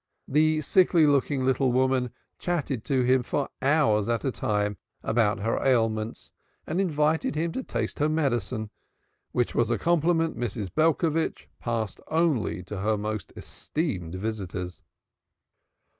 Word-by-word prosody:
The 155 +2 +3
sickly 175 +1 +4
looking 140 -2 +2
little 130 0 +2
woman 130 0 +2 0.3
chatted 150 -9 -2
to 130 -2 +2
him 130 +1 +4
for 135 +3 -2
hours 135 -8 +3
at 115 +3 0
a 135 - +1
time 105 -3 -1 0.3
about 110 -3 +1
her 115 +2 0
ailments 115 -4 0 0.3
and 170 +5 0
invited 155 -3 +1
him 165 +2 0
to 260 - -3
taste - - -3
her 150 +1 +2
medicine, 125 -7 -1 0.6
which 120 -1 0
was 120 - +2
a 120 - +1
compliment 165 +2 +2
Mrs. 110 -6 -4
Belcovitch 160 0 +1
passed 115 -3 -3
only 155 - +1
to 95 +2 -6
her 105 +2 +1
most 105 -1 -4
esteemed 95 - -4
visitors. 95 -3 -4
130 Hz, 135 wpm, -27 LUFS, 110-155 Hz, 0.6 s, sickly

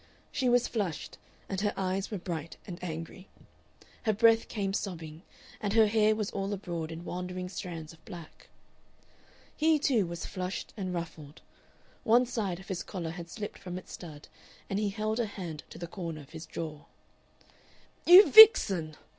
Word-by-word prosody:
She 260 -3 0
was 245 0 +3
flushed, 195 -10 -4 0.3
and 195 -1 -3
her 205 -1 0
eyes 190 +1 -1
were 210 - -3
bright 165 -3 -6
and 175 -2 -8
angry; 165 +2 -6 0.8
her 215 - +3
breath 225 +2 +4
came 195 -3 -2
sobbing, 165 -6 -5 0.4
and 205 -1 -1
her 225 -1 +6
hair 215 0 +3
was 215 -2 -3
all 195 0 -3
abroad 170 -5 -4
in 165 +2 -8
wandering 180 0 -5
strands 165 -4 -7
of 160 - -21
black. 170 -5 -12 1.1
He 315 0 +3
too 245 -9 +2
was 170 0 -6
flushed 185 0 -5
and 190 -4 -4
ruffled; 165 -3 -7 0.6
one 240 +3 +5
side 205 -7 -3
of 190 - -14
his 185 -2 -2
collar 170 -4 -5
had 170 0 -8
slipped 210 +3 -7
from 180 -1 -6
its 185 - -10
stud 155 -4 -10 0.4
and 195 - 0
he 210 -1 0
held 215 +2 -2
a 235 - 0
hand 175 -7 -7
to - - -11
the 175 - -5
corner 165 -3 -6
of 140 - -16
his 160 0 -9
jaw. 155 -2 -6 1.2
"You 365 +4 +10
vixen!" 195 - +8
185 Hz, 170 wpm, -30 LUFS, 165-215 Hz, 1.2 s, You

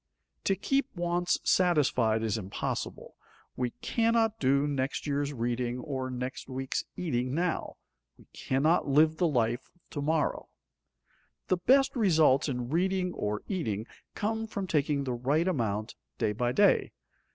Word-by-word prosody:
To 195 - +3
keep 270 +6 0
wants 175 0 0
satisfied 130 -11 +3
is 110 -3 0
impossible; 100 -3 -4 0.4
we 125 -1 -1
cannot 225 -1 +2
do 140 +1 +3
next 140 -2 -2
year's 145 0 -1
reading 120 -1 -2
or 130 0 -4
next 125 +1 -5
week's 130 0 -2
eating 130 -6 -1
now; 175 +1 -1 0.4
we - - -19
cannot 150 +7 +1
live 155 +3 +4
the 175 - +3
life 120 -3 0
of - - -31
to 145 - -4
morrow. 155 +1 0 1.0
The 185 - +3
best 265 +10 +3
results 160 - +4
in 125 -2 -3
reading 180 +1 +1
or 105 0 -3
eating 110 - -2 0.3
come 220 +2 -2
from 200 -3 -4
taking 145 -4 +1
the 130 -2 -2
right 140 +8 +1
amount 110 - -1 0.2
day 105 - +1
by 120 +3 0
day. 200 +10 +3
145 Hz, 140 wpm, -29 LUFS, 125-180 Hz, 1.0 s, live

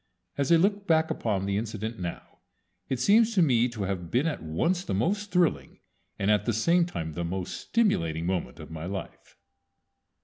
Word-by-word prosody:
As 140 +2 0
I - - +8
look 200 +4 +1
back 160 -1 +3
upon 100 -4 -1
the 100 0 0
incident 110 +1 -4
now 85 -1 -7 0.5
it 130 - -1
seems 220 - +4
to 185 - +5
me 125 -5 +3
to 110 -4 -5
have 95 -3 -3
been 125 - +1
at 160 - -2
once 165 - 0
the 100 - -2
most 200 - 0
thrilling, 180 -2 +1 0.4
and 100 +1 +1
at 105 0 +2
the 120 - +1
same 170 +10 +3
time 80 - -5
the 85 - -3
most 90 +2 -3
stimulating, 85 - 0
moment 85 -9 -2
of - - -10
my 80 +1 -6
life. 95 0 -7
115 Hz, 190 wpm, -27 LUFS, -, 0.5 s, I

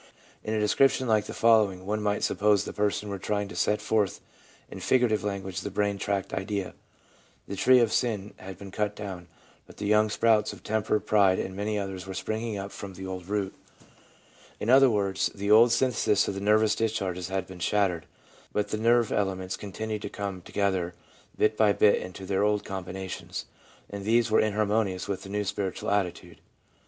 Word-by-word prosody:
In 110 - -2
a - - +1
description 130 +5 +3
like 110 -2 +2
the - - -7
following 105 -5 +3
one 105 +2 -1
might 105 0 0
suppose 105 -1 +2
the - - -6
person 105 0 -1
were 100 -1 -4
trying 100 +1 -1
to 85 - -9
set 105 +4 +1
forth 105 -4 +1 0.5
in - - -9
figurative 120 -6 +2
language 95 -3 -3
the - - -4
brain 100 0 -1
tract 100 -1 -2
idea: 95 -1 -3 0.4
' - - -33
The 100 - -5
tree 130 +6 +5
of 115 -3 +3
sin 105 -4 -1
had 95 -1 -9
been 100 0 -10
cut 105 +1 -2
down, 95 -4 -7 0.4
but - - -15
the 105 - -4
young 105 +1 +3
sprouts 110 -1 +2
of 90 - -14
temper, 110 0 0
pride, 100 -4 +3
and 95 - -4
many 105 +2 -2
others 95 -2 -5
were 95 - -6
springing 110 +2 -3
up 100 0 -6
from 100 -2 -8
the 95 - -7
old 90 -1 -6
root/ 100 -1 -2 1.1
In 115 - 0
other 135 0 +7
words, 100 -3 0
the 100 +1 -1
old 115 +2 +7
synthesis 115 -4 +2
of 100 0 -3
nervous 105 +1 +3
discharges 95 -5 -2
had 95 -1 -2
been 95 -1 -11
shattered, 90 -3 0 0.4
but 105 0 -1
the 110 - -2
nerve 115 0 +3
elements 95 -2 -1
continued 105 +1 -5
to - - -5
come 100 -2 -5
together 95 -2 -1 0.4
bit 110 0 +2
by 105 -2 +4
bit 105 0 +4
into 95 +1 -8
their 95 0 0
old 105 0 +1
combinations, 95 0 -6 0.4
and 100 -1 -7
these 115 +2 +2
were - - +5
inharmonious 105 -3 0
with 100 -2 -3
the 95 - -10
new 105 +1 -1
spiritual 100 -1 -3
attitude. 100 -4 -2
100 Hz, 190 wpm, -27 LUFS, 95-110 Hz, 1.1 s, other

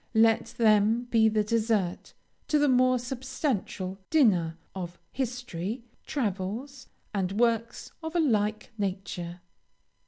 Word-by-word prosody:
Let 225 0 +4
them 220 +1 +4
be 220 -1 +5
the 215 -1 +2
dessert 215 -4 0 0.3
to 305 - +3
the 295 0 +4
more 255 -1 +4
substantial 245 -6 -3
dinner 185 - +3 0.2
of 175 -2 -6
history, 245 -4 -3 0.2
travels, 240 +1 -3 0.3
and 190 -2 -1
works 230 -1 0
of 320 +1 -5
a - - +4
like 215 -8 +1
nature. 180 -3 -3
220 Hz, 115 wpm, -28 LUFS, 195-250 Hz, 0.3 s, be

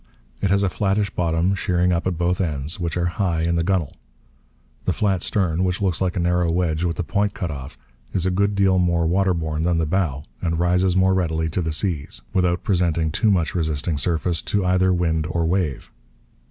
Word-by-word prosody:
It 100 - +1
has 100 +1 +3
a 95 - +2
flattish 100 +1 0
bottom, 85 +2 +1
sheering 90 -1 +1
up 85 +2 -1
at 90 -3 -1
both 90 +2 0
ends, 80 +2 -1
which 85 -1 -2
are 85 - 0
high 85 -1 0
in 85 +1 +1
the 85 - +1
gunwale. 90 -4 0 0.9
The - - +1
flat 95 -4 0
stern, 90 -4 0
which 90 0 0
looks 95 -4 0
like 90 -2 0
a - - -1
narrow 90 0 +1
wedge 85 -1 0
with 85 -2 0
the 90 - -1
point 100 +3 -1
cut 85 -3 -3
off, 70 +1 -8 0.3
is 90 -2 -1
a 95 - +2
good 100 +2 +1
deal 95 -2 +3
more 85 -2 +2
waterborne 85 -3 0
than 85 0 +1
the 80 - +1
bow 75 -5 -1 0.2
and 85 -2 -1
rises 90 +2 +2
more 95 0 +4
readily 80 -3 0
to 90 - -1
the 80 -1 -2
seas 80 -3 -2
without 90 -1 +1
presenting 85 -4 +1
too 110 +7 +1
much 90 -5 +1
resisting 80 -2 -1
surface 85 +1 0
to 100 -2 -1
either 95 0 +3
wind 80 -3 0
or 85 0 0
wave. 85 -5 -1
90 Hz, 205 wpm, -22 LUFS, 80-95 Hz, 0.9 s, more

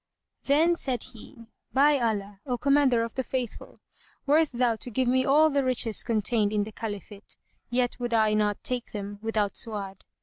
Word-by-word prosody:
Then 315 +5 +4
said 260 -8 -2
he, 230 +1 -13 0.3
"By 285 +1 +4
Allah, 205 -4 -2
O 250 -1 -1
Commander 275 -3 +3
of 230 - -5
the 260 - -2
Faithful, 250 -3 -5 0.5
wert 305 +2 +3
thou 240 -2 +1
to 245 - -5
give 255 +2 0
me 260 +1 +3
all 305 +3 +4
the 280 -1 +1
riches 245 -4 +2
contained 215 -1 +1
in 210 -1 +1
the 215 - -8
Caliphate, 205 -1 -8 0.3
yet 245 0 -1
would 240 -1 -3
I 220 -2 +3
not 210 -1 0
take 250 -1 -3
them 205 -1 -6
without 215 -2 -1
Su'ad." 200 -4 -3
235 Hz, 175 wpm, -27 LUFS, 215-260 Hz, 0.5 s, Then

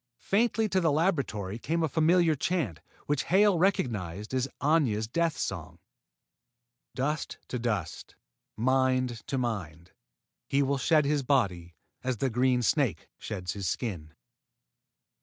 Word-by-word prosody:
Faintly 225 +1 +1
to 190 -2 +1
the 165 -3 +3
laboratory 135 - 0
came 165 +6 -1
a - - +2
familiar 165 +2 +3
chant, 150 - -1 0.3
which 145 -2 0
Hale 195 -1 +4
recognized 105 - -1
as 130 0 +1
Aña's 135 -9 +2
death 165 +6 0
song. 85 -2 -4 1.2
Dust 145 +3 -2
to 125 - -3
dust 105 -9 -3 0.4
Mind 130 0 +1
to 135 - -1
Mind 90 -9 -4 0.6
He 140 +1 +3
will 140 0 0
shed 155 +1 +3
his 145 0 +1
body 95 - 0 0.3
As 130 -2 -1
the 130 +3 0
green 125 +1 +2
snake 130 - +1
sheds 90 -1 -4
his 100 -4 -3
skin. 85 -9 -4
130 Hz, 130 wpm, -29 LUFS, 105-155 Hz, 1.2 s, Hale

